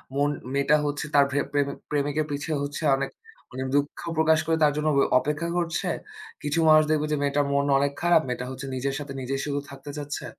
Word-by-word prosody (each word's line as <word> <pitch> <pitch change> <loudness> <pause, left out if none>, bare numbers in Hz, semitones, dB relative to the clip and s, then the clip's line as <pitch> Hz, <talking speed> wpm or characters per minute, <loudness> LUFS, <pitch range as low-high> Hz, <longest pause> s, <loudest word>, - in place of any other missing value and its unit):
মন 145 +1 +2 0.2
মেয়েটা 140 +2 +3
হচ্ছে 145 0 -2
তার 140 -1 +7
প্রেম 145 0 0 0.2
প্রেমিকের 145 +1 0
পিছে 145 +3 -3
হচ্ছে 145 +2 -4
অনেক 135 0 -2 0.4
অনেক 130 +1 -3
দুঃখ 145 0 0 0.2
প্রকাশ 160 0 +4
করে 160 0 +1
তার 150 - +5
জন্য 150 +1 0
ব - - +5 0.2
অপেক্ষা 150 +3 -2
করছে। 170 -1 -1 0.6
কিছু 150 +3 0
মানুষ 155 0 +7
দেখবে 150 -1 +2
যে 150 - +1
মেয়েটার 145 0 +1
মন 140 0 +2
অনেক 140 0 +1
খারাপ। 175 -2 +5
মেয়েটা 125 0 -3
হচ্ছে 135 +1 -7
নিজের 135 +2 -1
সাথে 140 -1 -6
নিজেই 135 +2 -2
শুধু 145 -1 -1
থাকতে 140 +1 -10
চাচ্ছে। 145 0 -5
145 Hz, 195 wpm, -26 LUFS, 140-150 Hz, 0.6 s, তার